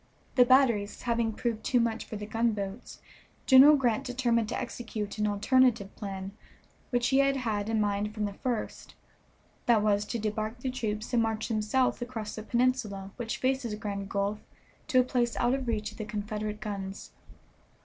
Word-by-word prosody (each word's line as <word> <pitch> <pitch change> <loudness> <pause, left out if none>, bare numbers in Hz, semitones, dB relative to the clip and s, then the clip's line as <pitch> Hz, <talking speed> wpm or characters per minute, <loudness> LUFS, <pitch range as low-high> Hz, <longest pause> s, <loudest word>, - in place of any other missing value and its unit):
The 250 - +6
batteries 240 -6 +3
having 235 -2 +1
proved 220 0 -3
too 250 - +2
much 230 -1 0
for - - -7
the 210 0 -5
gunboats, 215 -1 -3 0.4
General 275 +3 +8
Grant 245 -6 +1
determined 240 -3 0
to - - -2
execute 220 -4 -5
an 210 - +2
alternative 215 0 +2
plan 195 -2 -6 0.6
which 245 -1 +1
he 270 0 +4
had 275 0 +3
had 220 -5 -2
in 225 -1 +1
mind 205 0 0
from 215 -1 -2
the 200 - -4
first; 240 +2 -4 0.7
that 225 -3 +4
was, 205 -1 +2
to 225 - -3
debark 215 +2 -3
the 260 - -2
troops 220 -2 -3
and 235 - +4
march 225 0 -1
them 215 -2 0
south 255 +4 +1
across 230 -4 -5
the 215 - -6
peninsula 225 -5 0
which 235 -2 -3
faces 255 -4 -1
Grand 200 -2 -5
Gulf 200 +1 -1 0.5
to 265 -5 +4
a - - +6
place 245 -2 0
out 240 +1 +2
of 265 -2 -2
reach 215 -2 -1
of - - -15
the 215 - -3
Confederate 210 0 -4
guns. 200 -2 -6
225 Hz, 180 wpm, -29 LUFS, 210-245 Hz, 0.7 s, General